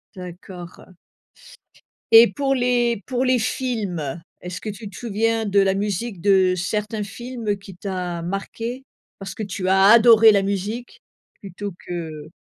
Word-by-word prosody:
D'accord. 180 0 -10 1.2
Et 230 +1 +10
pour 275 -1 0
les 240 -3 +1
pour 255 -1 -1
les 255 -1 +2
films, 200 - -3 0.2
est-ce 180 0 -6
que - - -9
tu 210 0 -8
te 195 - -14
souviens 225 0 0
de 200 -1 +3
la 195 -1 +2
musique 205 +1 -3
de 190 0 +3
certains 210 +4 -2
films 230 0 -4
qui 195 0 -12
t'a 180 -3 -4
marqué? 225 +8 -5 0.3
Parce 195 -1 -7
que 220 - -5
tu 190 -2 -3
as 190 0 +5
adoré 225 -1 +8
la 200 - +3
musique 200 +5 -4 0.4
plutôt 200 +1 -7
que 160 -3 -6
200 Hz, 145 wpm, -22 LUFS, 185-230 Hz, 1.2 s, Et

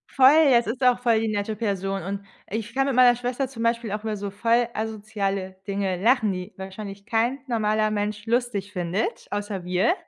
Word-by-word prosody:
Voll, 290 +4 +7
es 235 0 +4
ist 245 +4 -3
auch 250 -1 +4
voll 235 -3 +3
die 225 - 0
nette 210 0 -2
Person 195 -3 -2
und 195 +3 -4 0.3
ich 220 +2 -4
kann 270 +1 +1
mit 270 - 0
meiner 250 -1 +7
Schwester 245 +2 -2
zum 245 -3 -8
Beispiel 230 -1 0
auch 210 +1 -3
über 215 -1 -2
so 200 0 -5
voll 230 +3 +2
asoziale 205 -3 -3
Dinge 195 -2 -1
lachen, 225 -2 +3
die 180 0 -6
wahrscheinlich 195 +1 -8
kein 235 +4 +1
normaler 215 -3 +1
Mensch 205 0 -2
lustig 230 -4 -1
findet 180 +3 -2
außer 205 -2 -3
wir. 180 - +2
215 Hz, 190 wpm, -25 LUFS, 200-235 Hz, 0.3 s, Voll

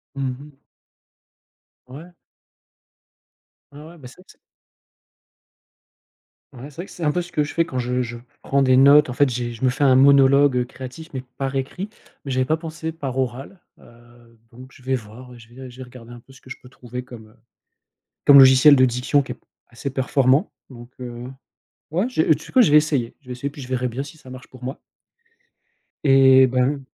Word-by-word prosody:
Mmh 135 -1 -3
mh. 145 +1 -14 1.3
Ouais. 155 +8 -12 1.6
Ouais, 145 +1 -13
ouais, 165 +2 -14
bah, 130 -4 -12
ça 155 +8 -17
c'est - - -19 2.2
Ah 120 - -12
ouais 145 - -9
c'est 140 - -20
vrai 175 +5 -7
que - - -16
c'est 175 - -9
un 150 - +2
peu 180 +1 -2
ce 175 - -14
que 150 -3 0
je 145 - -6
fais 165 - +1
quand 130 -4 -5
je 125 +1 -2
je 120 0 -7 0.3
prends 140 0 0
des 130 -1 +3
notes 140 +1 +6
en - - -4
fait 145 +2 +2
j'ai 120 -1 -4
je 115 +3 -4
me 130 - +4
fais 145 +3 -3
un 130 -1 +5
monologue, 140 0 +5
heu, 125 - 0
créatif 130 +6 -11
mais 130 -1 -5 0.2
par 135 0 -3
écrit 160 +9 -4 0.4
mais 135 - -5
j'avais 130 0 0
pas 155 +3 0
pensé 160 0 -7
par 135 -5 -6
oral, 130 +8 -4 0.2
heu, 120 -1 -21
donc 130 +3 -14
je 130 - -19
vais 130 0 -2
voir, 125 +2 -11
heu, - - -14
je 115 - -17
vais 130 +1 -11
je 120 - -17
vais 130 - -8
regarder 120 -1 -14
un 120 - -12
peu 135 - -21
ce 130 - -18
que 130 - -15
je - - -7
peux 125 - -16
trouver 125 -1 -9
comme, 115 -4 -13
heu, 110 - -24 0.9
comme 140 -1 +8
logiciel 135 +2 +7
de 130 - +3
diction 125 +4 0
qui 130 - -8
est - - -6
p - - -33 0.3
assez 120 +4 -6
performant 135 - +1 0.2
donc 120 -2 -13
heu, 120 -1 -8 0.7
ouais 185 +9 0
je 230 - 0
heu, 160 -1 +3
tu 160 - -12
sais - - -14
quoi? 255 - +5
Je 210 - +4
vais 150 - +7
essayer. 145 -6 -1
Je - - -33
vais 125 - -8
essayer 140 +3 -5
puis 145 -1 -12
je 125 - -11
verrai 125 -1 -2
bien 125 +3 -5
si 150 +2 -13
ça 130 - -15
marche 130 0 -11
pour 130 -1 -16
moi. 130 +3 -6 1.2
Et 130 -1 +6
ben 130 +2 -1
130 Hz, 220 wpm, -21 LUFS, 125-145 Hz, 2.2 s, comme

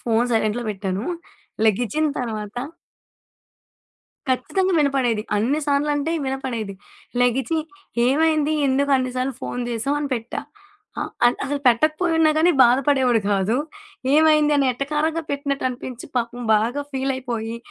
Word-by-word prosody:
Phone 230 0 +1
సైలెంట్‌లో 225 +1 +1
పెట్టాను. 195 0 -3 0.6
లెగిచిన 245 +8 +2
తర్వాత 215 -2 -5 1.7
ఖచ్చితంగా 375 +9 0
వినపడేది. 260 -6 +1
అన్ని 265 +9 +1
సార్లంటే 290 +2 +1
వినపడేది. 250 -7 -3 0.5
లెగిచి 260 +6 +1 0.5
ఏమైంది? 310 +2 +2
ఎందుకన్ని 265 -2 +1
సార్లు 255 0 -1
ఫోను 245 0 -4
జేసావు 240 +6 -1
అని 285 -2 -3
పెట్టా. 230 -1 -4 0.6
ఆహ్, - - -3 0.2
అం 240 - +3
అసలు 285 +1 -2
పెట్టకపోయున్నా 310 +5 +3
గానీ 335 +3 +5
బాధపడేవాడు 250 -1 +3
కాదు. 200 +4 +1 0.6
ఏమైంది? 305 -1 +5
అని 275 - +3
ఎటకారంగా 300 +5 -1
పెట్టినట్టనిపించి 260 -3 -3
పాపం 245 0 -2
బాగా 235 +7 +1
ఫీలయిపోయి 260 -4 -3
260 Hz, 110 wpm, -22 LUFS, 235-290 Hz, 1.7 s, గానీ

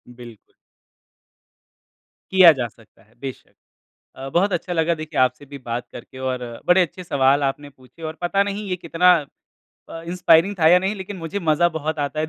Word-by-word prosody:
बिल्कुल। 120 -3 -14 1.8
किया 185 -3 +8
जा 125 -3 -3
सकता 115 0 -23
है, 110 +2 -29
बेशक। 135 -2 -9 0.6
अ, 135 +1 -7
बहुत 185 +5 +1
अच्छा 175 +1 -3
लगा 165 0 +1
देखिए, 155 -2 -4
आपसे 130 +3 0
भी 140 +1 -10
बात 120 +1 -3
करके 130 +2 -11
और 130 -1 -2 0.3
बड़े 180 +1 +5
अच्छे 180 +1 -3
सवाल 140 -2 +2
आपने 140 +1 -3
पूछे 130 +4 -21
और 160 - -17
पता 195 +3 +1
नहीं 205 +1 -5
ये 180 - 0
कितना 180 +1 +3 0.7
अ, 165 - -8
इंस्पायरिंग 180 +2 +3
था 160 - +5
या 180 +1 +6
नहीं। 195 +3 -2
लेकिन 190 0 -7
मुझे 165 +4 -5
मज़ा 165 -1 +2
बहुत 155 0 -3
आता 145 +2 -2
है 155 - 0
160 Hz, 180 wpm, -21 LUFS, 135-180 Hz, 1.8 s, किया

